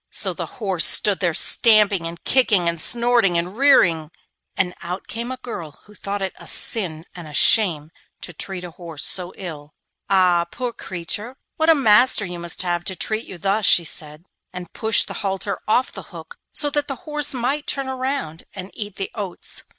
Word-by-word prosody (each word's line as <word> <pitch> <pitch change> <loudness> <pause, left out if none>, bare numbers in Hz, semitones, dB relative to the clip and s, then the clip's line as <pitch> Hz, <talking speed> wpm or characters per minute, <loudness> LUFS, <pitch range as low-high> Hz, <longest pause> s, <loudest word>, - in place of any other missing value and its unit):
So - - 0
the - - -5
horse 190 -7 0
stood 205 -2 +3
there 175 -4 0
stamping, 210 -6 +4
and 170 +1 -10
kicking, 215 -9 +2
and 170 -1 0
snorting, 235 -6 +3
and 175 +3 -3
rearing, 180 - +4 0.5
and 180 -1 0
out 180 +2 -6
came 235 +3 -5
a 260 - -5
girl 170 - -8
who 210 - -17
thought 200 -1 -4
it 190 - -3
a - - -12
sin 170 -7 +1
and 175 -3 -10
a 150 - -9
shame 165 -8 +3 0.3
to 175 - -9
treat 185 +3 -5
a 175 - -8
horse 165 -3 -4
so 180 -1 +1
ill. 155 -5 -9 0.3
'Ah, 180 -3 +3
poor 250 -2 -4
creature, 205 +6 -4 0.2
what 315 +1 +2
a 325 - +7
master 235 -4 +4
you 175 -1 -6
must 170 +1 -1
have 175 -1 -1
to 190 - -3
treat 215 +4 -2
you 185 - -9
thus!' 195 +3 0
she 175 - +5
said, 155 0 -5 0.3
and 180 -2 -9
pushed 220 0 +3
the - - -6
halter 195 -1 -3
off 245 +4 +2
the - - -8
hook - - -12
so 290 -1 0
that 290 0 0
the 275 - -4
horse 300 -3 +1
might 265 +5 -2
turn 275 -1 -1
round 260 - -4
and 190 0 -8
eat 205 -2 -7
the 195 - -5
oats. 200 -4 -5
195 Hz, 195 wpm, -21 LUFS, 175-235 Hz, 0.5 s, a